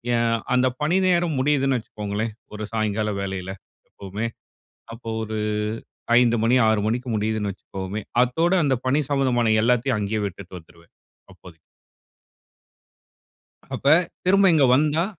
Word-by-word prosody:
என் 115 0 +1 0.2
அந்த 130 +1 +3
பணி 165 +5 +2
நேரம் 175 -4 +2
முடியுதுன்னு 135 -2 +2
வச்சுக்கோங்களேன், 105 0 -4 0.2
ஒரு 105 0 -5
சாய்ங்கால 110 -1 -1
வேலையில 95 -1 -4 0.4
எப்பவுமே. 100 +4 -5 0.7
அப்ப 115 - -13 0.2
ஒரு 110 0 -4 0.8
5 120 -1 +3
மணி 120 +3 +3
6 110 -2 +2
மணிக்கு 125 +3 -2
முடியுதுன்னு 105 -1 -1
வச்சுக்குவோமே, 95 +2 -6 0.2
அத்தோட 165 +8 0
அந்த 135 -2 +2
பணி 145 +4 +2
சம்மந்தமான 120 -5 +2
எல்லாத்தையும் 125 0 +2
அங்கேயே 105 +1 -2
விட்டுட்டு 95 0 -10
வந்துருவேன், 85 +1 -22 0.4
அப்போதைக்கு. 80 -3 -16 2.2
அப்ப - - -5 0.4
திரும்ப 195 +1 +5
இங்க 145 -3 +4
வந்தா 155 +4 +2
115 Hz, 120 wpm, -23 LUFS, 105-135 Hz, 2.2 s, திரும்ப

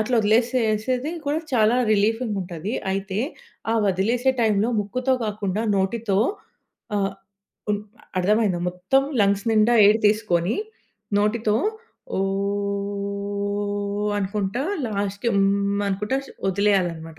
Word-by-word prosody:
అట్లా 215 +4 0
వదిలేసేసేది 235 +4 +1
కూడా 290 +2 +1 0.2
చాలా 220 0 +4 0.2
రిలీఫ్‌గుంటది. 205 -3 -1 0.2
అయితే, 195 +1 -3 0.5
ఆ - - +1
వదిలేసే 235 +8 +1
టైంలో, 215 +1 +2
ముక్కుతో 255 +6 0
కాకుండా 205 -1 -2 0.2
నోటితో 195 +1 0 0.8
ఆహ్, 195 -1 0 0.6
ఉప్ 205 - +1 0.4
అర్థమయిందా? 200 -1 +2
మొత్తం 180 +9 +1 0.2
లంగ్స్ 200 0 +3
నిండా 220 +2 +4
ఎయిర్ 210 +2 +6
తీసుకొని, 210 -4 +2 0.7
నోటితో 210 +1 +1 0.6
ఓ! - - 0 2.0
అనుకుంటా, 200 +4 -2 0.2
లాస్ట్‌‌కి 200 +1 -2
హ్మ్ 200 +1 +2
అనుకుంటా 210 +6 -1 0.3
వదిలేయాలన్నమాట. 175 -5 0
205 Hz, 95 wpm, -23 LUFS, 195-225 Hz, 2.0 s, ఎయిర్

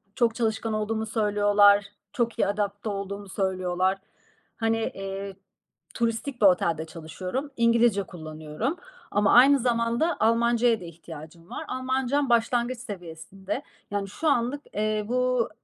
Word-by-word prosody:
çok 235 -3 +2
çalışkan 220 -1 -1
olduğumu 220 +1 -1
söylüyorlar. 205 -2 +4 0.3
Çok 235 -2 -1
iyi - - +3
adapte 205 +1 -2
olduğumu 200 0 -5
söylüyorlar. 185 -1 0 0.6
Hani, 225 0 +1 0.2
eee, 195 0 -5 0.6
turistik 235 +2 -2
bir - - +6
otelde 170 -3 +2
çalışıyorum. 180 - -5
İngilizce 230 -3 +3
kullanıyorum. 155 - -5 0.3
Ama 205 0 +3
aynı 270 +3 +7
zamanda 235 +6 +1
Almancaya 230 +1 +3
da 175 - -8
ihtiyacım 165 0 -11
var. - - -6
Almancam 260 +2 0
başlangıç 240 +1 +2
seviyesinde. 195 - -7 0.3
Yani, 200 -1 -2
şu 315 +10 -3
anlık, 265 +2 +1
eee, 215 0 0
bu, 250 0 +1
215 Hz, 125 wpm, -26 LUFS, 195-240 Hz, 0.6 s, aynı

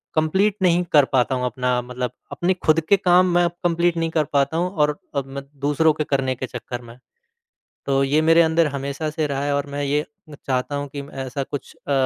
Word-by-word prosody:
Complete 190 +7 +2
नहीं 175 -1 +3
कर 145 -3 +7
पाता 130 0 +2
हूँ 125 0 -1
अपना 125 0 0
मतलब 125 -1 -4 0.2
अपने 180 +2 +1
खुद 155 +1 +5
के 200 - +6
काम 180 -1 +4
मैं 175 - +5
अब 170 - 0
कंप्लीट 170 0 +1
नहीं 165 0 0
कर 160 -1 +2
पाता 140 +3 +2
हूँ 175 +2 0
और 150 -5 +1 0.2
और 140 -1 -1
मैं 135 0 -7 0.2
दूसरों 150 +2 +3
के 155 - -2
करने 135 -2 0
के 130 - -4
चक्कर 125 -1 -6
में। 120 0 -13 0.9
तो 135 0 +2
ये 145 +3 +2
मेरे 165 +1 +5
अंदर 160 0 +3
हमेशा 140 +2 -3
से 155 0 -1
रहा 140 -1 -2
है 145 - 0
और 140 0 -1
मैं 145 0 -3
ये 145 +1 +1
अ, 150 0 -15
चाहता 130 +2 -1
हूँ 145 0 -3
कि 140 +1 -6
मैं 135 -1 -7
ऐसा 130 +2 -3
कुछ 140 +1 -7
अ, - - -2
145 Hz, 230 wpm, -22 LUFS, 135-165 Hz, 0.9 s, कर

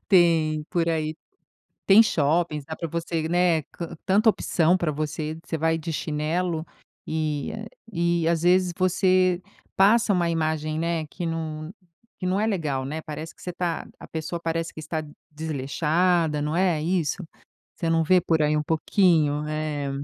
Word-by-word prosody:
tem 165 -5 +4
por 170 -2 +1
aí, 155 -1 -1 0.7
tem 205 +4 +8
shoppings, 155 -3 +1
dá 160 +1 -6
para 165 - -4
você, 165 0 -2
né, 175 -2 +3
can 170 - -7
tanta 205 +4 +4
opção 175 -4 +2
para 170 -4 0
você. 155 +1 -3
Você 160 - -3
vai 160 +1 +1
de 165 +1 -5
chinelo 160 +2 -1 0.4
e 155 -3 -2 0.4
e 170 -2 +1
às 165 -1 +1
vezes 180 0 +3
você 185 -1 +3 0.3
passa 210 +2 +4
uma 175 -2 +1
imagem, 155 -1 -1
né, 165 -1 -1
que 175 +4 -6
não 160 -1 -4 0.5
não 185 +2 0
é 215 - +1
legal, 155 -10 -1
não 145 - -4
é. 160 - -4
Parece 155 +2 -7
que - - -20
você 180 - -4
está 175 -2 -3
a - - -11
pessoa 165 +2 -4
parece 165 0 -2
que - - -9
está 155 0 -3 0.3
desleixada, 155 +2 0
não 150 +2 -1
é 175 -4 +2
isso. 175 +1 -1 0.5
Você 165 - -2
não 165 0 +3
vê 180 +3 +5
por 160 -2 +1
aí 150 0 +2
um 150 - +1
pouquinho, 155 -2 +2
é. 155 -2 -2
165 Hz, 165 wpm, -25 LUFS, 155-175 Hz, 0.7 s, tem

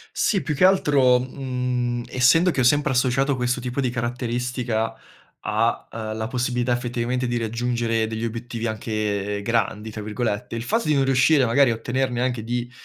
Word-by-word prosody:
Sì, 195 -5 +1
più 150 - -2
che 180 - +5
altro, 140 -9 +4
mhmm, 125 -2 -2
essendo 150 +8 +4
che 140 - -1
ho - - +4
sempre 145 +2 +3
associato 130 +2 +2
questo 125 -1 -1
tipo 125 +2 -2
di 130 - 0
caratteristica, 120 -1 -2 0.5
a, - - -1
ehm, 110 -1 -5
la 110 - -2
possibilità 125 -1 0
effettivamente 120 +1 -2
di 120 0 -1
raggiungere 115 0 -1
degli 110 +1 -3
obiettivi 115 0 -5
anche 105 -2 -2
"grandi" 110 -1 -1
tra 105 0 -7
virgolette, 105 0 -3
il 115 - -3
fatto 225 - 0
di 155 - +4
non 135 -1 +3
riuscire 135 +1 +4
magari 130 +2 +4
a 115 - +1
ottenerne 125 +1 -1
anche 125 -3 -1
di 120 +1 -3
120 Hz, 175 wpm, -23 LUFS, 115-130 Hz, 0.5 s, che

